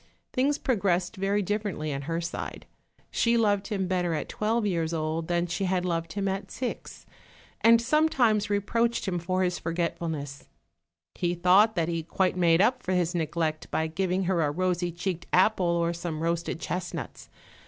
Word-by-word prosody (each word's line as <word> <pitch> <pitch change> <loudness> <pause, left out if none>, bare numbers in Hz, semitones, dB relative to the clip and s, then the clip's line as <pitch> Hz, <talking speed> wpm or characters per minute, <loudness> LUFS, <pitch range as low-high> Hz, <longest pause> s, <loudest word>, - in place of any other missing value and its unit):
Things 280 +3 +2
progressed 195 -5 0
very 200 +1 0
differently 195 -7 -2
on 140 - -3
her 165 0 0
side; 170 0 -5 0.5
she 235 0 +2
loved 205 -3 +2
him 195 -4 -1
better 180 -2 0
at 150 - -4
twelve 220 +1 0
years 170 -4 0
old 160 +1 -2
than 175 0 +1
she 185 +3 -2
had 180 -1 0
loved 165 -2 -2
him 200 -1 -1
at 195 0 -3
six, 250 -2 -6 0.6
and 230 0 +7
sometimes 235 -6 +2
reproached 230 +3 0
him 180 -2 0
for 185 +2 0
his 180 -1 -1
forgetfulness: 165 -5 -3 0.7
he 175 0 -1
thought 190 +5 +5
that 165 -3 +1
he 165 -1 -1
quite 180 +3 0
made 170 -1 +4
up 255 +4 +3
for 185 - -2
his 180 -1 +1
neglect 160 -1 -2
by 160 - 0
giving 180 +3 -1
her 180 -2 +1
a 150 - +2
rosy 175 +2 0
cheeked 175 0 -4
apple 185 0 +3
or 170 0 +1
some 165 -2 -4
roasted 170 0 -1
chestnuts. 180 +1 -5
180 Hz, 170 wpm, -27 LUFS, 170-205 Hz, 0.7 s, and